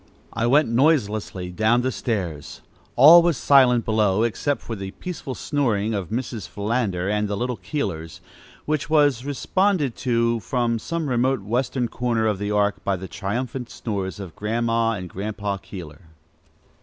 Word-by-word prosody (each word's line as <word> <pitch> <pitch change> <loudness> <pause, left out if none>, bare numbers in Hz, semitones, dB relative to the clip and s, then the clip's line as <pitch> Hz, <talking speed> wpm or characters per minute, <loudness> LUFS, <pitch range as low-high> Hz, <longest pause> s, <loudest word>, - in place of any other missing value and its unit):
I 115 - 0
went 145 +5 +4
noiselessly 110 - +1
down 110 +6 +2
the 130 - 0
stairs. 90 - -4 0.3
All 155 +7 +9
was 170 -4 +1
silent 125 -4 +4
below, 110 -2 +2
except 135 +5 -1
for 115 - -5
the 95 -2 -6
peaceful 145 - -6
snoring 115 -7 0
of 95 -5 -3
Mrs. 115 - -4
Philander 100 -4 -1
and 105 +1 0
the 100 0 -3
little 125 +1 -2
Keelers, 90 - -4 0.5
which 150 0 -1
was 145 -5 +3
responded 150 - 0
to 115 -2 +1
from 115 +2 -1
some 165 +5 -3
remote 130 -1 +1
western 120 +3 -1
corner 115 -2 -1
of 105 -3 0
the 100 0 -2
Ark 105 -1 0
by 100 - 0
the 95 +1 -7
triumphant 120 +6 -4
snores 100 -3 -4
of 95 -5 -8
Grandma 115 +1 0
and 90 -4 -5
Grandpa 100 +2 -4
Keeler. 85 -5 -10
115 Hz, 155 wpm, -23 LUFS, 100-130 Hz, 0.5 s, All